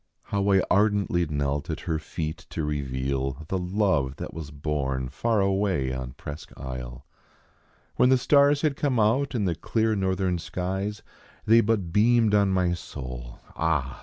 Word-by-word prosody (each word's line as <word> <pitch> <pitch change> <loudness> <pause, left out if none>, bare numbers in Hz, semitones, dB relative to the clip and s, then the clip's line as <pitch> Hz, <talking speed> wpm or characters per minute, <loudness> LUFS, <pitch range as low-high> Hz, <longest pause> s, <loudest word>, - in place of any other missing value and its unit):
IIo\v 100 -1 +3
I - - -3
ardently 100 -4 +2
knelt 70 +1 -2
at 80 - -3
her 80 -3 -1
feet 80 0 -5
to 80 - -3
reveal, 70 0 -2
The 95 - 0
love 90 -8 +1
that - - -7
was 80 -2 -6
born 70 -3 -2
far 110 - +1
away 95 -9 +1
on 65 -1 -5
Presque 75 +2 -8
Isle. 65 -1 -7 0.9
When 125 - +5
the 130 - +6
stars 140 +3 +4
had 150 -3 +2
come 135 -5 0
out 125 +6 +2
in 105 -4 0
the 90 - +1
clear 110 +6 0
northern 95 -2 0
skies 95 +5 -3 0.4
They 115 +2 +6
but 100 -7 0
beamed 115 0 +4
on 100 -1 +4
my 90 -2 +2
soul, 65 -7 -7
ah 75 -6 -1
90 Hz, 160 wpm, -26 LUFS, 70-105 Hz, 0.9 s, the